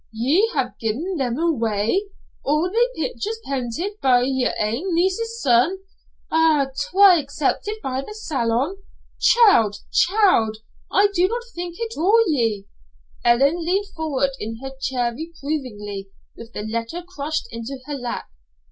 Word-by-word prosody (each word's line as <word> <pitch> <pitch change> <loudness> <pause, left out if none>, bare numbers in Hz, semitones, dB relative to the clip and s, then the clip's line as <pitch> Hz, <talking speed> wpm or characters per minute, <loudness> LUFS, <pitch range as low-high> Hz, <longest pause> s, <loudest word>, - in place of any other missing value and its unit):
"Ye 280 - +2
ha'e 255 -3 0
gi'en 290 - -2
them 250 -3 -1
awa'! 230 - +1 0.5
All 305 +6 +1
they 485 +3 +1
pictures 450 -2 -3
pented 275 - -3
by 250 -2 +4
yer 260 -1 +1
ain 255 - -1
niece's 455 +7 0
son! 260 - +3 0.5
An' 315 -4 +3 0.2
twa' 380 -2 +7
acceptit 305 +9 -2
by 265 0 -2
the 425 +10 -9
Salon! 275 - -1 0.4
Child, 395 - +5 0.2
child! 360 - +3 0.3
I'd 405 +1 +4
no 370 +6 +2 0.2
think 345 0 -5
it 460 -1 -4
o' 435 +7 +4
ye." 225 -9 0 0.6
Ellen 275 +8 +3
leaned 390 +4 0
forward 285 -4 0
in 225 +1 -5
her 270 - -5
chair 260 -2 -1
reprovingly, 255 -10 -5 0.3
with 230 0 -12
the 210 - -4
letter 230 +10 -4
crushed 315 -3 -4
in 230 0 -6 0.2
her 295 - -5
lap. 245 -4 -4
285 Hz, 135 wpm, -22 LUFS, 235-370 Hz, 0.6 s, twa